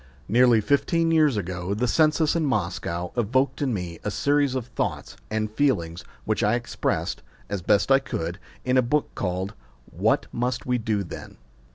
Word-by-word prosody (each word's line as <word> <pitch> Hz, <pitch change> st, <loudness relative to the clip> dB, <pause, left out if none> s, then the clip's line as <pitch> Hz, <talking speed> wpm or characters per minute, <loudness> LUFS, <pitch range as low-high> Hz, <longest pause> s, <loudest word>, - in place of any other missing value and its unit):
NEARLY 120 Hz, +1 st, +5 dB
fifteen 165 Hz, -, +2 dB
years 155 Hz, -7 st, +4 dB
ago 90 Hz, 0 st, -3 dB
the 125 Hz, +4 st, 0 dB
census 155 Hz, +2 st, +3 dB
in 165 Hz, -, +1 dB
Moscow 90 Hz, -, -2 dB
evoked 130 Hz, +5 st, +1 dB
in 140 Hz, -3 st, +1 dB
me 90 Hz, -6 st, -4 dB
a -, -, -1 dB
series 140 Hz, +4 st, +1 dB
of 130 Hz, -3 st, -2 dB
thoughts 120 Hz, -, -3 dB
and 110 Hz, 0 st, -1 dB
feelings 95 Hz, -10 st, 0 dB, 0.2 s
which -, -, 0 dB
I 105 Hz, +3 st, +3 dB
expressed, 120 Hz, 0 st, -2 dB, 0.3 s
as 100 Hz, -2 st, -3 dB
best 105 Hz, +7 st, +2 dB
I 135 Hz, -, +7 dB
could, 85 Hz, -9 st, -4 dB, 0.3 s
in 125 Hz, 0 st, +2 dB
a -, -, +6 dB
book 140 Hz, +5 st, 0 dB
called 95 Hz, +2 st, -2 dB, 0.4 s
What -, -, +1 dB
Must 125 Hz, +1 st, -2 dB
We 125 Hz, -1 st, +1 dB
Do 110 Hz, -3 st, -1 dB
Then? 85 Hz, -, -9 dB
120 Hz, 170 wpm, -25 LUFS, 100-135 Hz, 0.4 s, I